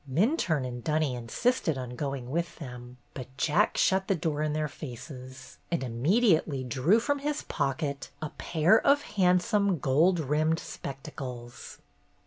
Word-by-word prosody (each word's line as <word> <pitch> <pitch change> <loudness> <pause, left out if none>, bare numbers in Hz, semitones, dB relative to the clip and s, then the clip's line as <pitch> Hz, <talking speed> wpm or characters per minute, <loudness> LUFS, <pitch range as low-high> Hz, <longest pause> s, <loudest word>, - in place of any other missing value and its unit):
Minturne 170 - +2
and 120 -1 -6
Dunny 155 -3 +1
insisted 160 - 0
on 125 -1 -5
going 135 -2 -4
with 170 +1 -2
them, 125 -4 -9 0.2
but 130 -3 -7
Jack 165 +9 +2
shut 190 0 +2
the 195 - +2
door 150 -2 -2
in 155 -1 0
their 155 0 0
faces, 130 -1 -10
and 170 -5 -1
immediately 155 - +2
drew 130 - +3
from 285 +5 0
his 295 +1 -2
pocket 140 0 -2
a 155 - -5
pair 170 +6 +3
of 285 +1 +4
handsome 195 0 +2
gold 155 +6 +3
rimmed 155 +2 +1
spectacles. 135 -6 -8
150 Hz, 140 wpm, -28 LUFS, 130-180 Hz, 0.2 s, of